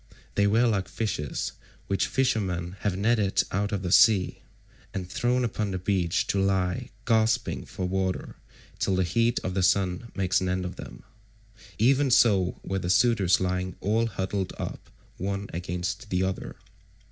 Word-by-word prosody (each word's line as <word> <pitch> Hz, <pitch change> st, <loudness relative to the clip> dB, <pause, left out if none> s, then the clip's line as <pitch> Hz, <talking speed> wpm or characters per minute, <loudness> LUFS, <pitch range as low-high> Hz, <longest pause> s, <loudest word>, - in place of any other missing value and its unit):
They 100 Hz, 0 st, +3 dB
were 115 Hz, +4 st, +3 dB
like 100 Hz, -5 st, +1 dB
fishes 100 Hz, -, -3 dB, 0.3 s
which 95 Hz, -1 st, 0 dB
fishermen 95 Hz, -9 st, 0 dB
have 95 Hz, -2 st, -1 dB
netted 105 Hz, -1 st, +2 dB
out 100 Hz, +2 st, -1 dB
of 100 Hz, -2 st, -2 dB
the 90 Hz, -, -2 dB
sea, 100 Hz, -1 st, +5 dB, 0.5 s
and 95 Hz, -2 st, -3 dB
thrown 125 Hz, +6 st, 0 dB
upon 105 Hz, -2 st, -2 dB
the 95 Hz, -, -2 dB
beach 90 Hz, -2 st, 0 dB
to 100 Hz, -, +2 dB
lie 95 Hz, -2 st, 0 dB, 0.2 s
gasping 110 Hz, -1 st, +1 dB
for 95 Hz, -, -5 dB
water 95 Hz, 0 st, -2 dB, 0.4 s
till 95 Hz, -, +1 dB
the 95 Hz, -, +2 dB
heat 115 Hz, +7 st, +1 dB
of 95 Hz, -, -2 dB
the 95 Hz, -, 0 dB
sun 95 Hz, +3 st, +1 dB
makes 95 Hz, -2 st, +1 dB
an 95 Hz, -, -1 dB
end 90 Hz, 0 st, -1 dB
of 90 Hz, -, -5 dB
them. -, -, -10 dB, 0.7 s
Even 135 Hz, +5 st, +3 dB
so 100 Hz, -7 st, +4 dB
were 95 Hz, 0 st, -2 dB
the 90 Hz, -, -3 dB
suitors 100 Hz, -2 st, +4 dB
lying 90 Hz, 0 st, -2 dB
all 110 Hz, +3 st, +1 dB
huddled 95 Hz, -2 st, -3 dB
up -, -, -6 dB, 0.3 s
one 100 Hz, +2 st, -3 dB
against 90 Hz, +6 st, -4 dB
the 90 Hz, -1 st, +1 dB
other. 95 Hz, 0 st, -3 dB
95 Hz, 160 wpm, -27 LUFS, 90-110 Hz, 0.7 s, sea